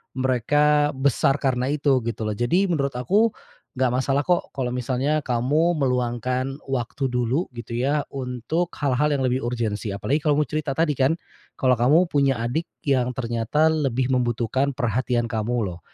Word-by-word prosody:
mereka 145 Hz, +4 st, +2 dB
besar 135 Hz, 0 st, +2 dB
karena 130 Hz, -2 st, 0 dB
itu, 140 Hz, -3 st, +2 dB
gitu 115 Hz, -1 st, -3 dB
loh. 110 Hz, -, -1 dB
Jadi 180 Hz, +11 st, +2 dB
menurut 140 Hz, -4 st, 0 dB
aku, 200 Hz, -, +3 dB, 0.5 s
nggak 130 Hz, 0 st, +2 dB
masalah 135 Hz, +3 st, +1 dB
kok 175 Hz, +3 st, 0 dB
kalo 130 Hz, -2 st, -2 dB
misalnya 130 Hz, +4 st, 0 dB
kamu 145 Hz, +8 st, +2 dB
meluangkan 130 Hz, 0 st, -1 dB
waktu 130 Hz, +1 st, -2 dB
dulu 125 Hz, +6 st, -1 dB
gitu 115 Hz, 0 st, -7 dB
ya, 140 Hz, +4 st, 0 dB
untuk 135 Hz, +6 st, -2 dB
hal-hal 145 Hz, +1 st, +1 dB
yang 140 Hz, -3 st, 0 dB
lebih 130 Hz, +1 st, 0 dB
urgensi 115 Hz, -3 st, -2 dB
apalagi 130 Hz, +9 st, -1 dB
kamu 150 Hz, 0 st, +2 dB
cerita 145 Hz, 0 st, -3 dB
tadi 160 Hz, -2 st, +2 dB
kan 140 Hz, +5 st, +1 dB, 0.4 s
kalo 130 Hz, -1 st, +3 dB
kamu 150 Hz, +10 st, +4 dB
punya 140 Hz, -5 st, +1 dB
adik 125 Hz, +9 st, -2 dB, 0.2 s
yang 130 Hz, -3 st, +2 dB
ternyata 120 Hz, +6 st, +1 dB
lebih 130 Hz, -3 st, 0 dB
membutuhkan 125 Hz, +2 st, 0 dB
perhatian 120 Hz, -1 st, 0 dB
kamu 110 Hz, -3 st, -1 dB
loh. 85 Hz, -, -12 dB
130 Hz, 155 wpm, -23 LUFS, 120-145 Hz, 0.5 s, kamu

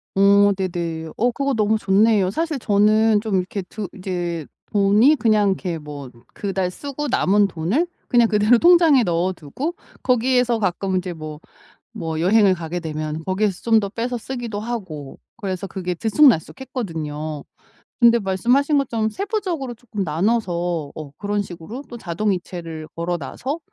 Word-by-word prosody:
어 200 Hz, +1 st, +5 dB
네네. 170 Hz, -4 st, -3 dB
어 245 Hz, +2 st, +2 dB
그거 275 Hz, +2 st, -1 dB
너무 215 Hz, 0 st, +2 dB
좋네요. 205 Hz, -1 st, +3 dB
사실 315 Hz, -, -2 dB
저는 215 Hz, +1 st, +3 dB
좀 215 Hz, -4 st, 0 dB
이렇게 185 Hz, +1 st, -3 dB
드 205 Hz, +2 st, -6 dB
이제 175 Hz, -4 st, -3 dB, 0.3 s
돈이 210 Hz, +8 st, +5 dB
그냥 215 Hz, -6 st, +3 dB
이렇게 180 Hz, -3 st, -2 dB
뭐 145 Hz, -3 st, -9 dB, 0.2 s
그달 190 Hz, -2 st, -1 dB
쓰고 285 Hz, +8 st, -5 dB
남은 205 Hz, -5 st, +3 dB
돈을 195 Hz, -, -1 dB, 0.2 s
그냥 240 Hz, -2 st, +4 dB
그대로 215 Hz, +3 st, +4 dB
통장에 335 Hz, -6 st, +6 dB
넣어두고 175 Hz, -, -2 dB, 0.3 s
거기에서 250 Hz, -1 st, +2 dB
가끔 190 Hz, -1 st, 0 dB
이제 180 Hz, -1 st, -3 dB
뭐, 155 Hz, -2 st, -8 dB, 0.5 s
뭐 160 Hz, -1 st, -4 dB
여행을 195 Hz, +2 st, +4 dB
가게 170 Hz, 0 st, -5 dB
되면 155 Hz, -1 st, -4 dB
거기에서 190 Hz, 0 st, -1 dB
좀 225 Hz, -1 st, +4 dB
더 200 Hz, -2 st, -1 dB
빼서 240 Hz, +4 st, -3 dB
쓰기도 235 Hz, -3 st, -5 dB
하고 185 Hz, -, -6 dB, 0.2 s
그래서 195 Hz, -3 st, -4 dB
그게 180 Hz, -2 st, -3 dB
들쑥날쑥했거든요. 165 Hz, -, 0 dB, 0.6 s
근데 235 Hz, 0 st, +6 dB
말씀하신 245 Hz, +9 st, +2 dB
것처럼 225 Hz, -5 st, 0 dB
세부적으로 365 Hz, -, -3 dB
쪼끔 220 Hz, -4 st, -5 dB
나눠서 175 Hz, -3 st, -1 dB
어 155 Hz, -3 st, -8 dB
그런 205 Hz, 0 st, -1 dB
식으로 190 Hz, +8 st, -8 dB
또 240 Hz, -, -7 dB
자동이체를 175 Hz, -4 st, -3 dB
걸어놔서 180 Hz, -, -3 dB
200 Hz, 325 characters per minute, -21 LUFS, 175-235 Hz, 0.6 s, 통장에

